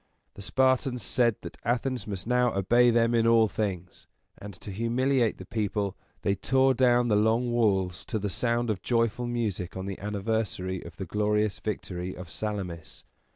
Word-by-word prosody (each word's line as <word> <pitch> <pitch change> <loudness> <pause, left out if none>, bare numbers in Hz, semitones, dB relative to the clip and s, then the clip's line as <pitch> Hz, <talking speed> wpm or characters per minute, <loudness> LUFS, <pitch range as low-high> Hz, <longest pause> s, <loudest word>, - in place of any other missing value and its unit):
The - - -11
Spartans 130 +1 +1
said 120 0 +2
that - - -9
Athens 125 +1 -1
must 95 -4 -5
now 125 -1 +2
obey 120 +6 +4
them 115 0 +3
in 115 -1 +3
all 115 -1 +5
things; 95 -5 -4 0.3
and, 100 - -8
to 100 - -9
humiliate 120 +3 +1
the 95 - -9
people, 105 -2 -2 0.3
they 100 - +2
tore 130 +6 +3
down 120 -1 +3
the 105 - +3
Long 110 +3 +2
Walls 95 -6 +1
to 110 - -2
the 105 -1 -2
sound 120 +4 0
of 100 - -4
joyful 115 0 0
music 105 -7 -2
on 95 - -4
the 95 -1 -5
anniversary 100 -2 -2
of 85 -1 -11
the 95 - -4
glorious 105 +2 0
victory 95 -4 -4
of 90 -2 -9
Salamis. 95 -6 -5
110 Hz, 170 wpm, -28 LUFS, 100-120 Hz, 0.3 s, all